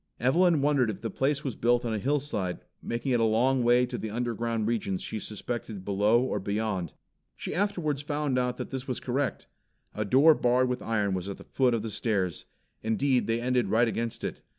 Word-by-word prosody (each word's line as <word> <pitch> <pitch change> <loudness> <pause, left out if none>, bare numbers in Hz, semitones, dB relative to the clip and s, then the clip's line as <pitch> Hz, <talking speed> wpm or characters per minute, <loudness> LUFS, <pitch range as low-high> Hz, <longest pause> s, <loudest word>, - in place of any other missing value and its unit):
Evelyn 160 +4 +3
wondered 140 -5 +3
if 105 - -5
the 115 - -3
place 140 +2 0
was 135 -6 -3
built 120 +1 +2
on 115 - -1
a 110 - -1
hillside, 130 -8 -1 0.2
making 120 +3 -2
it 120 - +3
a - - +3
long 125 +4 +3
way 120 +1 +4
to 125 - -5
the 110 - -4
underground 115 -1 -2
regions 105 -5 -1
she 110 - -4
suspected 105 -2 -5
beyond 105 +5 +3
or 105 - -1
below. 100 -2 -2 0.5
She - - -5
afterwards 175 -8 0
found 145 -3 -1
out 125 0 -1
that - - -6
this 130 -1 -5
was 125 - -2
correct. 130 +1 -2 0.5
A 105 - -2
door 135 +10 +6
barred 125 -2 +2
with 125 0 -2
iron 105 -3 0
was 95 +1 -3
at 100 - -5
the - - -12
foot 125 -3 +1
of 110 - -2
the 110 - -4
stairs. 95 -6 -1 0.4
Indeed, 125 +4 +1
they 115 +1 +1
ended 125 -3 +1
right 115 +4 +3
against 115 0 -3
it. - - -4
120 Hz, 205 wpm, -28 LUFS, 110-130 Hz, 0.5 s, door